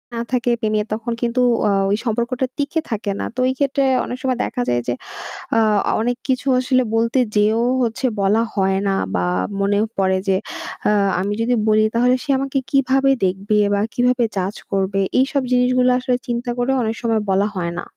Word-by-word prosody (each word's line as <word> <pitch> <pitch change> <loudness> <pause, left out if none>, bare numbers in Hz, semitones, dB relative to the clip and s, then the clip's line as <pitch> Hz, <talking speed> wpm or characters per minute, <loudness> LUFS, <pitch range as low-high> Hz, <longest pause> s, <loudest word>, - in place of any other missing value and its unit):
না 230 - -2
থাকে 245 -1 +1
প্রেমীয়া 215 -1 0
তখন 230 +2 -3
কিন্তু 240 +1 0 0.3
ও - - +3 0.2
ওই 205 - +2
সম্পর্কটা 235 +3 -1
টিকে 290 +3 -1
থাকে 210 -2 -2
না। - - -2
তো - - -5
এই 260 - -2
ক্ষেত্রে 275 -1 +1 0.2
অনেক 250 - -5
সময় 255 -2 0
দেখা 245 - -3
যায় 120 0 +1
যে, 120 - +1 0.6
আ - - +5 0.4
অনেক 245 +1 -1
কিছু 260 +1 0
আসলে 255 0 +2
বলতে 230 +3 +2 0.2
যেয়েও 215 +2 +3 0.2
হচ্ছে 230 +3 -2 0.2
বলা 205 +3 +3
হয় 190 -1 +1
না 195 - +2 0.2
বা 90 - 0 0.4
মনে 200 +1 +1 0.2
পড়ে 190 -1 +2
যে, 190 - +4 0.5
"আ - - +4 0.3
আমি 200 +2 -1
যদি 240 +2 +1 0.2
বলি 215 0 +4
তাহলে 250 +2 +4
সে 300 - -14
আমাকে 275 0 -2
কিভাবে 270 0 +3
দেখবে? 195 +3 0 0.2
বা 200 - +1
কিভাবে 250 0 +2
judge 190 +2 -2
করবে?" 195 0 0 0.2
এইসব 275 +1 +1
জিনিসগুলো 250 0 +3
আসলে 250 -1 0
চিন্তা 240 +1 -3
করেও 250 +2 +1
অনেক 220 0 -1
সময় 225 -2 +1
বলা 195 +2 +2
হয় 170 -1 -2
না। - - -6
235 Hz, 185 wpm, -20 LUFS, 205-255 Hz, 0.6 s, আ